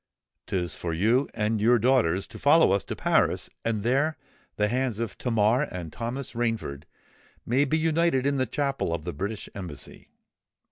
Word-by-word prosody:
'Tis 90 -2 -2
for 85 -2 -3
you 115 +10 +2
and 110 0 0
your 120 +3 +5
daughters 110 -7 +2
to - - -12
follow 155 - +5
us 100 0 +2
to - - -5
Paris; - - +1
and 110 -3 -1
there 140 +6 +1 0.4
the 105 - +1
hands 125 -1 -1
of 115 -3 -3
Tamar 115 +1 +2
and 85 -3 -7
Thomas 120 +3 -4
Rainford 115 - -2 0.6
may 130 +5 +2
be 155 +3 +1
united 160 -4 +2
in 140 0 +1
the 130 -1 0
chapel 135 - -1
of 80 -2 -8
the - - -3
British 100 +8 -4
Embassy. 90 -7 -9
115 Hz, 170 wpm, -26 LUFS, 100-135 Hz, 0.6 s, your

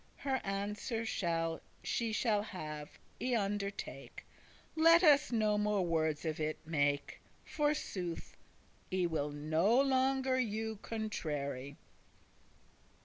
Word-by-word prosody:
Her 265 -2 -1
answer 210 +3 -2 0.8
she 230 -1 -1
shall 215 -1 +2
have, 155 -8 -7 0.2
I 250 -1 +1
undertake, 200 -1 -3 0.5
Let 330 +2 +7
us 295 -4 +6
no 215 -3 +2
more 210 -3 +1
wordes 160 -2 0
of 160 -1 -2
it 155 0 -1
make. 145 -3 0 0.2
Forsooth, 250 - -2 0.6
I 185 -1 +1
will 155 -3 -1
no 155 - +2
longer 265 -1 +2
you 220 -2 -2
contrary." 145 - -3
205 Hz, 100 wpm, -34 LUFS, 155-240 Hz, 0.8 s, Let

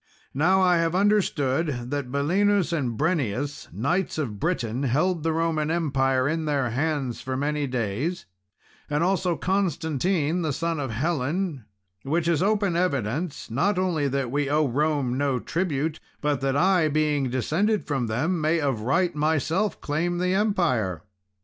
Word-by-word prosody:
Now, 180 +7 +3
I 180 -1 +4
have 165 +1 +1
understood 150 -10 +1
that 140 -3 -3
Belinus 180 +6 +2
and 125 -8 -1
Brennius, 145 - -1
knights 150 - -1
of 115 -10 -3
Britain, 125 - -1
held 155 +7 +1
the 165 +1 0
Roman 160 -1 0
Empire 135 -5 +1
in 160 +1 -1
their 140 -5 0
hands 140 -2 -1
for 130 0 -3
many 145 +1 -1
days, 125 - -2 0.6
and 150 +2 +1
also 185 -1 +1
Constantine, 175 -2 0
the 155 -4 -1
son 165 +2 -2
of 135 -2 -3
Helen, 150 - -1 0.4
which 160 +6 -1
is 165 -3 +2
open 200 -2 +1
evidence, 145 - -1
not 180 - +1
only 175 -6 +1
that 135 -2 -1
we 145 0 0
owe 150 0 +2
Rome 140 -1 0
no 140 -3 +1
tribute, 160 0 -2 0.2
but 145 -3 0
that 135 0 +1
I, 180 0 +4
being 150 -3 +1
descended 180 - 0
from 135 -5 -1
them, 155 +10 0
may, 160 +2 +2
of 135 -7 -1
right, 170 +10 +1
myself 160 +6 0
claim 170 +4 -1
the 180 +1 +1
empire." 160 - +1
150 Hz, 150 wpm, -25 LUFS, 135-175 Hz, 0.6 s, I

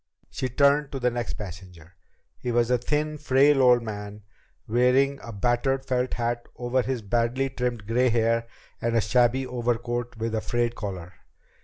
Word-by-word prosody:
She 130 - -3
turned 140 +2 +3
to 135 - -3
the 125 -1 +1
next 120 -2 -3
passenger. 90 -4 -10 0.5
He 125 - -3
was 120 0 +2
a 125 - +3
thin, 150 +4 -1
frail 140 0 +4
old 125 -2 +5
man, 105 -1 -7 0.4
wearing 125 +4 +3
a 115 - -8
battered 120 +5 0
felt 125 -1 -1
hat 120 0 -2
over 125 +1 0
his 125 -2 -3
badly 120 +5 0
trimmed 125 -4 -3
gray 125 +4 +2
hair 115 0 +1 0.3
and 115 0 0
a 115 - +4
shabby 125 +4 +2
overcoat 120 -1 -2
with 115 0 -3
a 110 - 0
frayed 120 0 -1
collar. 95 -5 -6
120 Hz, 165 wpm, -26 LUFS, 115-130 Hz, 0.5 s, old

